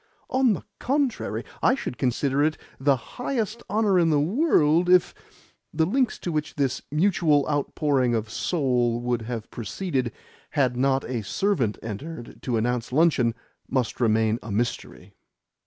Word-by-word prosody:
"On 260 -3 +4
the - - -5 0.2
contrary, 275 -2 -1 0.2
I 255 - +4
should 125 - -6
consider 135 +2 +1
it 155 +1 +1 0.2
the 140 +1 +3 0.3
highest 235 -3 -2
honour 205 -2 +3
in 165 -1 +3
the 150 -2 +3
world 175 - +3
if 180 -1 +5 0.3
" - - -35
The 160 0 +3
lengths 245 +5 +1
to 175 - -3
which 150 -1 -2
this 135 -3 0
mutual 155 -3 +3
outpouring 140 -3 +1
of 110 -1 -2
soul 125 -3 0
would 120 -1 -1
have 115 -1 -6
proceeded 130 - -2 0.5
had 130 -3 +3
not 135 +1 +2
a 120 -3 -3
servant 125 - 0
entered 120 +5 -7
to 120 -3 -1
announce 120 +1 -1
luncheon 130 -6 +3 0.3
must 130 -2 -1
remain 110 0 +2
a 115 - -9
mystery. 115 +4 -3
140 Hz, 150 wpm, -25 LUFS, 120-175 Hz, 0.5 s, if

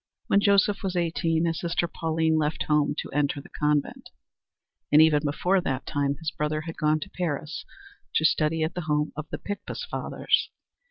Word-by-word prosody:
When 200 - +4
Joseph 200 0 +3
was 190 -2 -2
eighteen 165 -1 +1
his 165 -1 -1
sister 170 0 0
Pauline 160 -1 0
left 150 +1 0
home 150 -1 +2
to - - -4
enter 145 0 0
the 140 - -12
convent, 150 -1 -1 0.8
and 150 - +7
even 155 -1 +6
before 180 +6 +1
that 135 -6 -2
time 140 0 0
his 160 -1 -3
brother 155 0 -2
had 165 +1 -7
gone 155 0 +2
to - - -6
Paris 155 -4 -3 0.5
to 160 - +3
study 155 +1 +2
at 160 - -1
the 180 - -3
home 150 -1 0
of 155 0 -6
the - - -4
Picpus 205 -1 -5
Fathers. - - 0
155 Hz, 180 wpm, -26 LUFS, 150-170 Hz, 0.8 s, and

